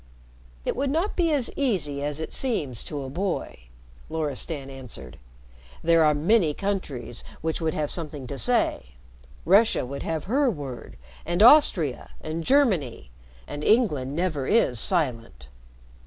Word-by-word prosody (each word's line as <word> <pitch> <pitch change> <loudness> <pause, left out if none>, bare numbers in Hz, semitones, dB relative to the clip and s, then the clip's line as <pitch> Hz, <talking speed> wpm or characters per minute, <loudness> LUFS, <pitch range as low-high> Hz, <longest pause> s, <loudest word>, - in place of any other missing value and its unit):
"It - - -1
would 275 +1 -1
not 330 +9 0
be 335 -3 +2
as 275 -6 +1
easy 160 - -1
as 145 +1 -3
it 160 - -5
seems 150 - -2
to 145 -2 -5
a 135 - -6
boy," 175 - -3 0.4
Loristan 150 -2 -3
answered. 125 - -10 0.6
"There 165 0 +5
are 150 -1 +4
many 165 0 +2
countries 150 - -4 0.2
which 160 +1 -2
would 160 -1 -1
have 150 -1 -1
something 150 -5 -1
to 135 +1 -6
say 235 - 0 0.5
Russia 200 - +4
would 140 +2 -6
have 160 -2 -3
her 265 +6 +2
word, 140 - -7 0.3
and 175 +4 +1
Austria, 195 - +5
and 160 +1 -4
Germany; 180 - +1 0.4
and 145 - -6
England 150 - +2
never 160 -6 -1
is 130 - +2
silent. 115 - -2
160 Hz, 140 wpm, -25 LUFS, 135-205 Hz, 0.6 s, There